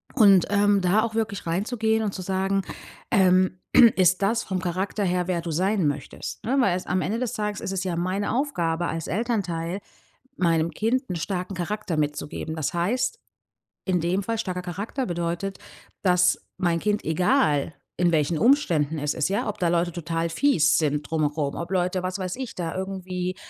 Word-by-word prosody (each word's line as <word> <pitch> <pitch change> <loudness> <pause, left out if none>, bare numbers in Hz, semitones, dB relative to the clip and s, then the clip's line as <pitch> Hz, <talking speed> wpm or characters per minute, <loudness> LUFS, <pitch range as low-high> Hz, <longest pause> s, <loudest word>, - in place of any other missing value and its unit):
Und, 200 -7 +6
ähm, 205 -1 +3
da 185 +4 +3
auch 225 -1 -3
wirklich 220 -5 -2
reinzugehen 220 +5 0
und 205 -2 -2
zu 185 - -5
sagen, 195 +1 0 0.5
ähm: 185 -2 +3 0.4
„Ist 185 0 +3
das 225 +4 +1
vom 190 -1 -2
Charakter 185 +3 -2
her, 180 -1 0
wer 180 -2 0
du 170 0 -4
sein 185 +1 +1
möchtest?", 145 0 -5
ne? 260 +5 +1
Weil 195 -8 +3
es 185 - -7
am 185 +1 +1
Ende 215 +6 -1
des 250 -2 -2
Tages 210 -1 -3
ist - - -3
es 190 -1 -1
ja 180 -3 -2
meine 185 +5 -1
Aufgabe, 175 - 0
als 165 -1 -4
Elternteil 190 -4 -2 0.6
meinem 165 -2 +2
Kind 255 +5 0
'n 180 - -2
starken 185 +3 -3
Charakter 185 -1 -3
mitzugeben. 150 +1 -3
Das 155 -3 -2
heißt 245 - 0 0.7
in 180 -3 +1
dem 175 +4 0
Fall 230 +3 -2
starker 180 -4 -3
Charakter 200 +9 -4
bedeutet, 175 +1 -3 0.4
dass 180 -1 +3 0.2
mein 170 -2 +1
Kind, 210 +3 -1
egal 155 -3 +2 0.3
in 175 -1 +3
welchen 155 0 +1
Umständen 160 - +2
es 150 0 -1
ist 150 - +1
ja, 200 +2 -1
ob 210 - -4
da 175 - +2
Leute 175 +1 +1
total 165 0 -2
fies 165 - +3
sind 150 -2 0
drumherum, 150 -2 -1
ob 170 +1 -5
Leute, 185 0 0
was 185 +2 -3
weiß 185 -1 -3
ich 260 -2 -6
da 170 -3 -4
irgendwie 185 -1 -3
185 Hz, 180 wpm, -25 LUFS, 170-205 Hz, 0.7 s, Und